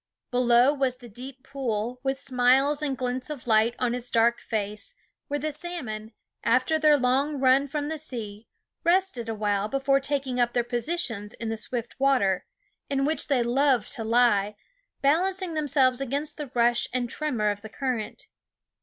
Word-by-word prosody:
Below 245 +2 +4
was 265 -3 0
the 245 -1 -12
deep 255 +4 -10
pool, 250 -3 -3
with 270 0 -1
smiles 265 +3 +3
and 280 -3 -1
glintings 255 +1 -3
of 295 -5 -7
light 225 0 +3
on 245 -2 0
its 245 0 -5
dark 235 +1 +3
face, 210 - -4 0.3
where 290 0 -2
the 310 +2 -2
salmon, 255 -10 -6 0.3
after 255 +7 +2
their 305 -1 +5
long 275 +3 +1
run 265 +1 +4
from 290 +1 -3
the 315 0 -3
sea, 225 -7 -6 0.4
rested 345 -10 +1
awhile 210 -2 0
before 275 +3 +2
taking 275 -2 -2
up 240 0 +2
their 240 - +2
positions 240 -4 -2
in 230 - -4
the 225 - -1
swift 235 +3 -5
water, 255 -9 +2 0.4
in 275 -1 +1
which 315 +2 0
they 265 -4 +2
love 255 -1 +2
to 245 -5 -4
lie, 220 -3 +3 0.5
balancing 365 +5 +1
themselves 275 -4 +2
against 285 +3 -3
the 295 -3 -6
rush 240 0 +3
and 250 -1 -1
tremor 235 -7 -1
of 205 0 -6
the 220 - -9
current. 245 -3 -3
255 Hz, 165 wpm, -26 LUFS, 235-280 Hz, 0.5 s, their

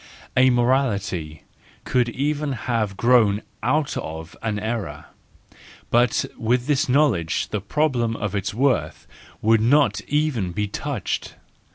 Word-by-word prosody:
A 130 +1 +6
morality 110 - 0 0.4
could 125 -1 +1
even 145 +3 -1
have 110 -5 -2
grown 110 -3 +3 0.2
out 145 +3 0
of 80 +1 -6
an 110 -2 -2
error: 110 0 -4 0.9
but 120 0 +3
with 120 +2 +1
this 145 -2 +1
knowledge 125 - +2
the 105 - -2
problem 120 -1 0
of 105 -3 -3
its 100 0 -2
worth 130 +3 0 0.4
would 110 0 +4
not 125 -1 +3
even 140 - 0
be 105 +1 -1
touched. 100 - -4
120 Hz, 125 wpm, -23 LUFS, 105-130 Hz, 0.9 s, A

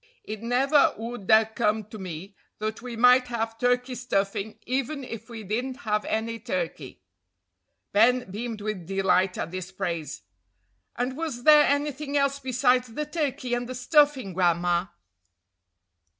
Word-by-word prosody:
"It 215 0 -7
never 265 +5 +3
would 225 -3 -7
'a' 220 0 +7
come 220 -1 0
to 215 - -8
me 185 +1 -7 0.2
that 215 +1 -4
we 245 -1 -6
might 250 +2 +5
have 225 -1 -3
turkey 245 +1 +1
stuffing 200 -4 -2
even 270 +3 -2
if 230 -2 -8
we 225 -2 -7
didn't 245 +6 -2
have 210 -1 0
any 230 +1 -2
turkey." 175 - -4 0.9
Ben 235 +1 +3
beamed 225 +1 -5
with 205 -5 -4
delight 190 -1 +2
at 165 - -4
this 185 0 -6
praise. 170 -6 -4 0.7
"And 250 +2 -2
was 295 -6 -4
there 300 0 +8
anything 290 0 -1
else 280 0 +1
besides 255 -1 +2
the 300 +7 -3
turkey 290 -5 -2
and 245 0 -2
the 255 - -5
stuffing, 265 - +3
Gran'ma?" 175 0 +1
230 Hz, 145 wpm, -26 LUFS, 195-255 Hz, 0.9 s, there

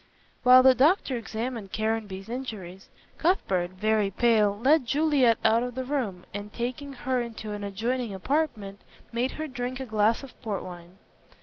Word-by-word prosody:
While 255 0 +8
the 260 0 +8
doctor 275 +2 +3
examined 230 -2 -5
Caranby's 215 -3 -2
injuries, 215 -7 -7 0.3
Cuthbert, 195 - +1
very 210 +2 +1
pale, 210 -1 +2
led 265 +3 +3
Juliet 280 -5 +3
out 225 +1 +4
of 245 0 -4
the 260 - -2
room, 245 -10 -3
and 205 +1 -6
taking 255 +5 -4
her 255 0 -1
into 225 -2 -6
an 205 0 -5
adjoining 230 +4 -2
apartment, 205 -2 -2 0.3
made 245 +2 -1
her 310 0 -4
drink 250 -1 -4
a 265 - -4
glass 220 +2 +1
of 270 - -13
port 205 -4 -3
wine. 175 0 -11
230 Hz, 160 wpm, -27 LUFS, 205-260 Hz, 0.3 s, While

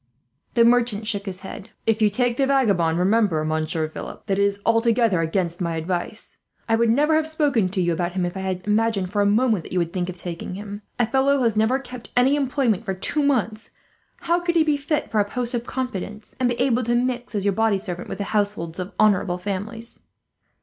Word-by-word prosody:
The 235 -1 +6
merchant 235 -3 +2
shook 205 -1 -2
his 185 -1 -4
head. 195 +2 -9 0.2
"If 225 0 +1
you 215 - +5
take 240 +3 0
the 270 - +2
vagabond, 200 -12 +2
remember, 185 -4 +2
Monsieur 155 0 -1
Philip, 155 - -9
that 195 -2 0
it - - +4
is 200 0 +1
altogether 230 -4 +3
against 170 +1 -1
my 170 -2 -1
advice. 175 +6 -4 0.3
I 225 - +3
would 230 0 +2
never 295 +7 +3
have 315 0 +2
spoken 285 - +1
to 190 +1 -3
you 175 -1 +1
about 175 +1 -2
him, 185 -1 0
if 175 - -4
I - - -4
had 185 -1 -3
imagined 210 -3 +1
for 205 0 +1
a 200 - +3
moment 215 -3 +2
that - - -10
you - - 0
would 170 -1 0
think 180 -2 -2
of 185 - -7
taking 175 +1 -6
him. 205 +1 -7 0.2
A 240 - +3
fellow 270 +4 +2
who 265 - 0
has 230 -2 +2
never 220 +4 +3
kept 250 -3 -10
any 260 +3 +5
employment 260 -7 0
for 195 -3 -3
two 290 +10 0
months, 230 -6 0 0.5
how 340 +1 +1
could 345 0 -1
he 325 - +5
be 305 -2 +2
fit 290 +2 -2
for 215 - +2
a - - +5
post 245 +1 -2
of 240 0 -3
confidence, 215 -4 -5
and 250 -1 +2
be 240 - -2
able 250 -1 +2
to 240 0 0
mix 245 -1 -1
as 200 -1 -1
your 200 - +3
body 225 0 +2
servant 180 -3 -6
with - - -5
the 200 - -2
households 200 -5 -1
of 185 +2 -5
honourable 195 -4 +3
families?" 205 +5 -5
215 Hz, 230 wpm, -23 LUFS, 185-245 Hz, 0.5 s, The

